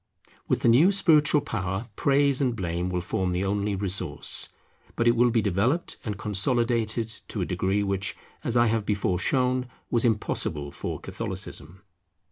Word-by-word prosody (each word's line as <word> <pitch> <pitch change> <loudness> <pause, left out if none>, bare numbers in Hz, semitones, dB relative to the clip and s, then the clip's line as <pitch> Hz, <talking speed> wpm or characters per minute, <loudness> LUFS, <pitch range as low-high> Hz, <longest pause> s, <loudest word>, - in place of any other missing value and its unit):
With - - 0
the - - +2
new 140 +12 +6
spiritual 155 -6 +4
power 95 0 -3
praise 140 0 +2
and 125 -3 +1
blame 90 -3 -2
will 90 -1 -1
form 90 0 -1
the 90 +2 -1
only 100 +1 -1
resource; 95 -1 0 0.5
but 120 - +1
it 120 - +5
will 120 +1 +4
be 115 -2 +1
developed 110 - 0
and 105 -3 -4
consolidated 115 +2 0 0.2
to 105 - -4
a - - 0
degree 95 +3 0
which, 100 +1 -2 0.3
as 120 0 0
I 120 - +5
have 115 -1 +1
before 100 -3 0
shown, 125 +4 +1 0.2
was 120 - +3
impossible 75 - -1
for - - -5
Catholicism. 85 +6 -7
110 Hz, 160 wpm, -26 LUFS, 95-120 Hz, 0.5 s, new